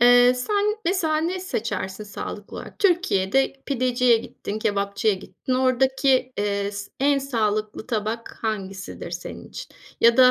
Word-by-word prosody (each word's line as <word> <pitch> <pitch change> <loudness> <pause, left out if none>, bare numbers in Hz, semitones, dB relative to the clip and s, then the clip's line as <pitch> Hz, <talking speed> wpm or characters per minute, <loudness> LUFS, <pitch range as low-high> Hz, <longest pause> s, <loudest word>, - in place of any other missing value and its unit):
Eee, 245 +1 +7
sen 415 - 0
mesela 335 -3 +1
ne 340 +4 -1
seçersin, 215 - -3
sağlıklı 210 - -7
olarak? - - -9
Türkiye'de 270 - +2
pideciye 250 -2 +3
gittin, 215 -1 -5
kebapçıya 200 0 +1
gittin. 225 +6 -4
Oradaki, 260 0 +2
eee, 200 0 0
s 200 0 -6
en 280 +1 +4
sağlıklı 215 -5 -1
tabak 225 0 -3
hangisidir 195 -3 -4
senin - - -7
için? - - -9 0.2
Ya 235 0 +6
da 255 -1 +8
245 Hz, 135 wpm, -24 LUFS, 210-270 Hz, 0.2 s, da